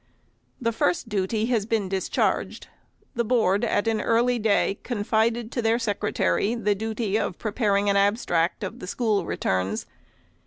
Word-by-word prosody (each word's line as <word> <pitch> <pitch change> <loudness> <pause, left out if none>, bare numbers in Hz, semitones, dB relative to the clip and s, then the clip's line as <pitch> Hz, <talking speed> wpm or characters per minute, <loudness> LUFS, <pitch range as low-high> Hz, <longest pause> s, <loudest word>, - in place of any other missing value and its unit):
The 230 -3 0
first 220 -1 0
duty 210 +2 0
has 215 -3 0
been 220 -4 0
discharged. 190 0 -1 0.5
The 235 - 0
Board 215 -4 +2
at 205 +2 +1
an 220 -1 +1
early 240 +2 +2
day 205 -2 +1
confided 225 +1 0
to 240 - -1
their 225 0 +2
Secretary 210 0 0
the 210 -3 +1
duty 220 0 -2
of 180 - -3
preparing 205 -2 0
an 200 - +3
abstract 200 -4 +1
of 190 - -5
the 180 - -8
school 215 -1 0
returns. 95 +3 -1
215 Hz, 150 wpm, -25 LUFS, 200-230 Hz, 0.5 s, an